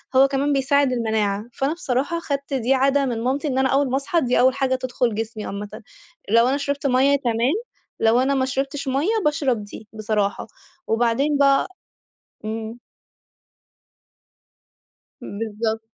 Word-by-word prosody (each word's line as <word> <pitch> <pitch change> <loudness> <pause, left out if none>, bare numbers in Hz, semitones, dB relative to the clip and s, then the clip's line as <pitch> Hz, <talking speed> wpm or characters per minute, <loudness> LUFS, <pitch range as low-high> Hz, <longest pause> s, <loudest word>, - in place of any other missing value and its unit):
هو 270 +1 +7
كمان 280 +1 0
بيساعد 275 0 +2
المناعة. 220 -3 -1
فأنا 275 +3 -1
بصراحة 305 0 -1
خدت 280 -3 -4
دي 260 0 +1
عادة 275 +1 +2
من 235 -3 -2
مامتي 275 +4 -1
إن 260 -2 -1
أنا 265 0 +2
أول 275 0 +2
ما 260 - 0
اصحى، 300 +5 0
دي 250 -1 +1
أول 255 +1 +5
حاجة 265 -1 0
تدخل 250 -3 -1
جسمي 220 -1 -4
عامةً، 205 +3 -7 0.5
لو 230 +3 +5
أنا 270 +2 +1
شربت 285 0 -2
مَيّة 275 +2 +3
تمام، 240 +4 +1 0.5
لو 225 +2 +4
أنا 265 +2 +2
ما 260 -1 +1
شربتش 275 +2 -3
مَيّة 275 +9 +1
باشرب 270 -7 +1
دي، 205 +1 -11
بصراحة، 215 -2 -2 0.4
وبعدين 240 +6 +1
بقى 275 -1 +4 0.8
إمم. 220 +1 -5 2.4
بالضبط. 220 +1 -3
260 Hz, 145 wpm, -22 LUFS, 225-275 Hz, 2.4 s, هو